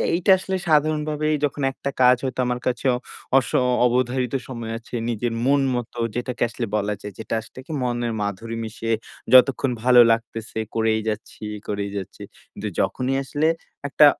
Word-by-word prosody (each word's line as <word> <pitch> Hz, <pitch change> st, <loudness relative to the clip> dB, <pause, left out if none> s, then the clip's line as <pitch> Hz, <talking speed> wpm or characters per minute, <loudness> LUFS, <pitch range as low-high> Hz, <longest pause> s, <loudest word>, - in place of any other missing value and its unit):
এইটা 185 Hz, +2 st, +3 dB
আসলে 190 Hz, +1 st, -3 dB
সাধারণভাবেই 155 Hz, 0 st, +2 dB
যখন 145 Hz, 0 st, -4 dB
একটা 140 Hz, -, -4 dB
কাজ 125 Hz, 0 st, +7 dB
হয়তো 130 Hz, -1 st, -3 dB
আমার 125 Hz, 0 st, -1 dB
কাছে 125 Hz, +1 st, -1 dB, 0.5 s
অস 130 Hz, -, +2 dB, 0.4 s
অবধারিত 125 Hz, +1 st, +1 dB
সময় 115 Hz, -3 st, -5 dB
আছে, 115 Hz, +1 st, -9 dB
নিজের 115 Hz, +1 st, -1 dB
মন 140 Hz, +1 st, +4 dB
মত 120 Hz, -2 st, -4 dB, 0.2 s
যেটাকে 125 Hz, 0 st, -4 dB
আসলে 120 Hz, 0 st, -3 dB
বলা 105 Hz, 0 st, 0 dB
যায়, 105 Hz, -, -7 dB
যে -, -, -6 dB, 0.2 s
আসলে 115 Hz, +3 st, -13 dB
কি 160 Hz, -, -9 dB
মনের 120 Hz, -1 st, -1 dB
মাধুরী 105 Hz, +3 st, -3 dB
মিশিয়ে 115 Hz, +1 st, -3 dB, 0.4 s
যতক্ষণ 130 Hz, 0 st, +6 dB
ভালো 125 Hz, -1 st, +7 dB
লাগতেছে 115 Hz, -1 st, -2 dB, 0.2 s
করেই 110 Hz, -1 st, +2 dB
যাচ্ছি, 110 Hz, 0 st, -6 dB, 0.2 s
করেই 100 Hz, -1 st, -2 dB
যাচ্ছি। 95 Hz, -, -7 dB, 0.3 s
কিন্তু -, -, -6 dB
যখনই 130 Hz, +1 st, 0 dB
আসলে 145 Hz, +3 st, 0 dB, 0.4 s
একটা 150 Hz, +2 st, +6 dB
125 Hz, 155 wpm, -23 LUFS, 115-135 Hz, 0.5 s, কাজ